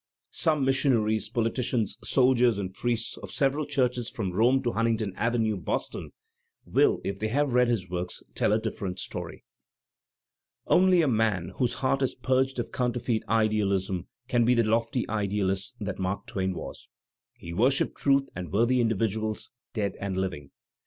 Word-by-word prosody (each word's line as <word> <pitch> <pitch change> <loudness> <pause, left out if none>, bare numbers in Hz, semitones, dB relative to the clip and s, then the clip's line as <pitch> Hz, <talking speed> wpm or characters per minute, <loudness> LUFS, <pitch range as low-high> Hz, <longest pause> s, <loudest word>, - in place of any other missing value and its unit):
Some 150 -4 +1
missionaries, 115 -6 +2
politicians, 115 -2 -1
soldiers, 125 -4 +3
and 95 -2 -4
priests 115 +2 -2
of - - -9
several 140 +2 +1
churches 125 -4 0
from 100 -5 -3
Rome 125 +7 +3
to 120 - 0
Huntington 115 -3 0
Avenue, 115 -2 0
Boston, 85 - -3 0.6
will, - - +3
if 100 0 -3
they 110 - -1
have 140 +3 0
read 125 0 +4
his 110 -6 0
works, 90 0 -3
tell - - +1
a 105 - +4
different 100 -4 -4
story. - - -6 1.2
Only 180 -2 +5
a - - +2
man 110 -7 +1
whose 125 -2 0
heart 135 +1 0
is 130 - 0
purged 130 0 +1
of 120 - -3
counterfeit 120 -2 -1
idealism 100 -4 +1 0.2
can 120 -2 +2
be 125 +2 +4
the 115 - +3
lofty 115 +2 0
idealist 100 -2 -1
that 100 -2 -4
Mark 95 +1 -2
Twain 95 -1 -2
was. - - -8 0.5
He 85 - -8
wor 115 +9 +4
shipped 140 - 0
truth 140 -1 +2
and 90 -2 -6
worthy 120 +5 +3
individuals 110 -1 -1 0.2
dead 105 -3 -1
and 100 -2 -3
living. 80 -7 -3
115 Hz, 160 wpm, -27 LUFS, 100-125 Hz, 1.2 s, Only